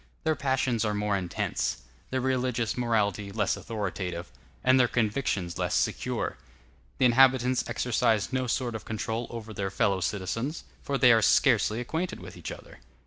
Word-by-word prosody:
Their 160 -1 +2
passions 130 -4 0
are 105 -1 0
more 105 0 0
intense; 90 -3 -2 0.3
their 130 0 -1
religious 125 -3 0
morality 105 -4 0
less 105 +1 0
authoritative; 95 -4 -4 0.3
and 130 +1 +5
their 125 - +5
convictions 105 -7 -1
less 90 -1 0
secure. - - -1 0.6
The - - +3
inhabitants 130 0 +4
exercise 115 -1 +1
no 130 -1 0
sort 120 0 -1
of 110 - -6
control 110 +2 -3
over 115 -2 -7
their 100 -1 -2
fellow 95 0 +1
citizens, 115 - -2 0.2
for 140 - -1
they 125 -1 +6
are 115 -1 +5
scarcely 115 -2 +3
acquainted 160 +9 -3
with - - -10
each - - -7
other. - - -11
115 Hz, 155 wpm, -28 LUFS, 105-130 Hz, 0.6 s, they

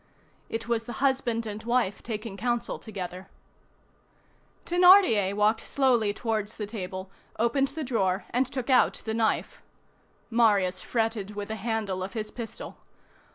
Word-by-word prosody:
It 225 0 -4
was 230 -1 0
the 240 - -6
husband 255 -3 0
and 210 0 -5
wife 235 -3 0
taking 220 -2 -5
counsel 240 +2 -1
together. 185 -3 -7 1.4
Thénardier 350 - +6
walked 210 +2 +2
slowly 245 -6 +2
towards 215 -1 -3
the 210 - -3
table, 190 -3 -6 0.3
opened 235 +5 +2
the 305 +3 -5
drawer, 195 -7 0
and 250 +2 +2
took 260 0 -3
out 255 - +3
the 220 - -2
knife. 220 -1 0 0.7
Marius 200 -6 +3
fretted 220 -3 -2
with 205 0 -5
the 220 - -2
handle 210 -3 -2
of 190 +1 -5
his 215 -2 -4
pistol. 230 -3 -7
225 Hz, 140 wpm, -27 LUFS, 205-240 Hz, 1.4 s, Thénardier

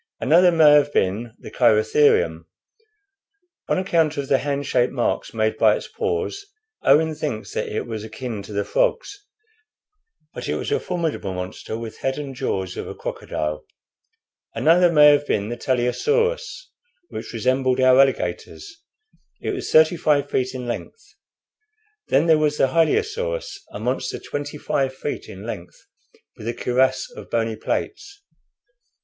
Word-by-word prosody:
Another 175 +3 +5
may 160 -3 +6
have 145 -1 +5
been 110 +4 -1
the - - -11
Cheirotherium. 110 - +3 1.2
On - - +2
account 165 -5 +1
of 140 -1 -3
the 135 - +4
hand 140 0 -2
shaped 125 -1 +1
marks 120 -3 -1
made 110 -1 0
by - - +5
its - - -6
paws, 435 -2 -3 0.3
Owen 160 +3 +4
thinks 150 -8 -5
that - - -2
it 105 - -3
was 110 -2 -5
akin 110 0 -6
to 100 - -11
the 100 0 -2
frogs; 475 -5 -1 1.1
but - - -6
it - - 0
was - - -4
a 435 - +2
formidable 165 - -3
monster, 90 +4 -6
with 115 -1 -8
head 135 +1 -2
and 140 -2 -5
jaws 95 -7 -3
of - - -5
a - - -7
crocodile. 75 0 -4 0.9
Another 175 +2 +4
may 150 -2 +6
have 145 0 +2
been 100 +1 -1
the 120 - -3
Teleosaurus, 465 - -1 0.4
which - - -7
resembled 130 +2 +1
our 130 0 +5
alligators. 325 - -1 0.6
It - - -3
was 385 -2 -4
thirty 160 +2 +5
five 145 -3 +1
feet 130 0 -1
in 125 -1 -5
length. 120 - -7 0.9
Then 140 +4 +3
there 160 -2 +4
was 150 -1 +1
the 135 - +3
Hylaeosaurus, 445 - 0
a - - -7
monster 125 +3 -2
twenty 145 +1 -6
five 135 -3 -1
feet 145 - -5
in 95 +2 -10
length, 100 -7 -7 0.6
with 110 - -8
a 120 - -2
cuirass 130 +1 +1
of - - -10
bony 115 -1 -1
plates." 400 - -4
135 Hz, 155 wpm, -22 LUFS, 115-165 Hz, 1.2 s, may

